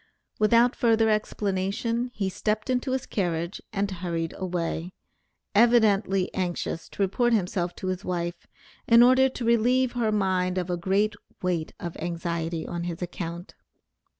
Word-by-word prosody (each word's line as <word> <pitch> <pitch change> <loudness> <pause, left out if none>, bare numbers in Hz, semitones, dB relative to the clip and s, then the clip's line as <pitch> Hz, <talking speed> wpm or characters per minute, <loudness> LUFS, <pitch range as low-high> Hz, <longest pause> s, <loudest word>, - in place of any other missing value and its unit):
Without 230 +3 +4
further 225 -2 +3
explanation, 215 +3 -1
he 200 -2 -1
stepped 215 +5 -1
into 255 +1 0
his 260 - -2
carriage 170 -2 -2
and 200 -1 -1
hurried 170 -3 -3
away, 175 -1 -3 0.6
evidently 205 -4 +3
anxious 175 -2 -3
to 200 - -2
report 240 +5 +1
himself 180 -4 0
to - - -7
his 185 +1 -2
wife, 175 -2 -3 0.4
in 230 0 +8
order 260 +2 +5
to 250 -2 -5
relieve 240 +2 +3
her 235 -3 0
mind 185 -3 +1
of 180 0 -2
a - - +1
great 195 +5 +1 0.3
weight 175 -3 -1
of 170 -1 -5
anxiety 170 -1 -3
on 170 0 -4
his 175 0 -4
account. 175 0 -6
190 Hz, 145 wpm, -26 LUFS, 175-225 Hz, 0.6 s, in